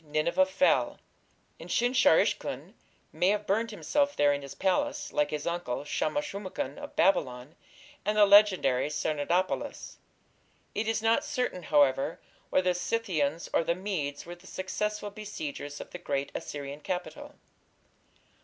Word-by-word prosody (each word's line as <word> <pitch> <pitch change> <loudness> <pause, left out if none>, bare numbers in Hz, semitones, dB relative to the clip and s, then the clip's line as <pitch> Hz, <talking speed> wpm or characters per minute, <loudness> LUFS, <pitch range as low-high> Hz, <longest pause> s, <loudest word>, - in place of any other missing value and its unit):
Nineveh 155 +5 +1
fell, 190 +9 +2 0.6
and - - -9
Sin 245 +1 +2
shar - - +6
ishkun - - -1 0.4
may 180 - +1
have 205 +1 +1
burned 220 +4 +1
himself 285 +6 0
there 145 0 +4
in 140 - -3
his 140 -1 -9
palace, 290 +9 0
like 150 0 +2
his 150 -1 -4
uncle, 170 -7 -2
Shamash 295 - -1
shum 200 -7 -6
ukin 140 -6 -4
of - - -9
Babylon, 130 -7 +1 0.5
and 210 0 0
the 210 - +8
legendary 195 -10 +5
Sardanapalus. 155 +5 -1 0.8
It 215 +2 -2
is 225 0 0
not 225 +6 +3
certain, 250 -10 -2
however, 145 -2 +2 0.3
whether 185 -1 +3
the - - 0
Scythians 175 -6 -1
or - - +3
the 170 - 0
Medes 175 -7 -3
were 175 - -7
the 175 +2 -15
successful 210 +3 -3
besiegers 155 -9 -6
of - - -9
the 180 - -7
great 140 -4 -2
Assyrian 140 0 -6
capital. 180 +3 -5
180 Hz, 150 wpm, -29 LUFS, 145-210 Hz, 0.8 s, the